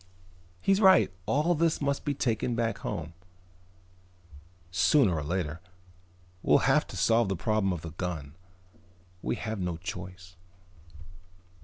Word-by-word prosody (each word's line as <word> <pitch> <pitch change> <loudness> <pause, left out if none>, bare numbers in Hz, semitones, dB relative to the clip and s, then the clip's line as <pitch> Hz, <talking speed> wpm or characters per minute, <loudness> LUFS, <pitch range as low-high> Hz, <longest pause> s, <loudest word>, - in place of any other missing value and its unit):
He's 195 - +2
right: 190 - +6 0.2
all 155 +5 +2
this 165 0 +1
must 140 -1 -1
be 145 -1 -1
taken 120 -1 -1
back 115 -1 -1
home, 80 +2 -5 1.6
sooner 95 - +3
or 80 - -2
later. 85 0 -3 0.8
We'll - - +3
have - - +3
to - - -8
solve 115 -2 +3
the 95 - 0
problem 105 +1 0
of 90 -2 -4
the 80 - -6
gun. 80 -4 -5 0.9
We - - -1
have 110 -2 -4
no 90 -2 -2
choice." 90 -1 -8
95 Hz, 130 wpm, -28 LUFS, 90-130 Hz, 1.6 s, right